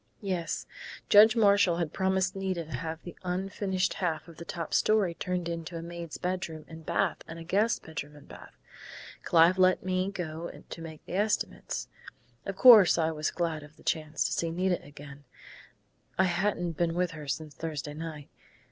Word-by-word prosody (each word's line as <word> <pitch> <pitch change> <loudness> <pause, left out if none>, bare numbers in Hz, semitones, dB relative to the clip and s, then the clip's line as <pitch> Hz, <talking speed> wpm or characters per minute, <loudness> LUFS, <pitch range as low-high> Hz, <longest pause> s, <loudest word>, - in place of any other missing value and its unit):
"Yes. 180 -4 -2 0.4
Judge 215 +3 +8
Marshall 200 -5 +4
had 170 -3 -2
promised 190 -1 +1
Nita 190 -3 -2
to 155 - -13
have 160 +3 -5
the 175 - -9
unfinished 190 +1 -1
half 160 -3 -2
of 165 -2 -13
the 170 - -8
top 165 -1 -5
story 210 -5 +3
turned 180 0 -3
into 170 0 -5
a 165 - -6
maid's 170 -2 -7
bedroom 175 -4 -3
and 160 -1 -11
bath - - 0
and 165 - -8
a 165 - -8
guest 205 +7 +1
bedroom 150 -2 -7
and 145 - -15
bath. - - -13 0.6
Clive 170 +3 +4
let 185 0 +4
me 185 +1 0
go 170 -3 -5 0.2
to 165 - -8
make 160 -2 -9
the - - -8
estimates. 205 +3 -1 0.6
Of 195 - -3
course 215 -6 +8
I 160 -1 +2
was 155 -1 -1
glad 165 -3 -2
of 150 +1 -14
the - - -18
chance 155 -1 -1
to - - -1
see 165 - 0
Nita 180 +2 0
again 145 0 -12 0.9
I 190 - +5
hadn't 175 -1 0
been 170 -1 +1
with 180 0 0
her 155 -2 -9
since 150 +2 -4
Thursday 150 -2 -5
night. 155 -2 -7
170 Hz, 180 wpm, -29 LUFS, 160-185 Hz, 0.9 s, Judge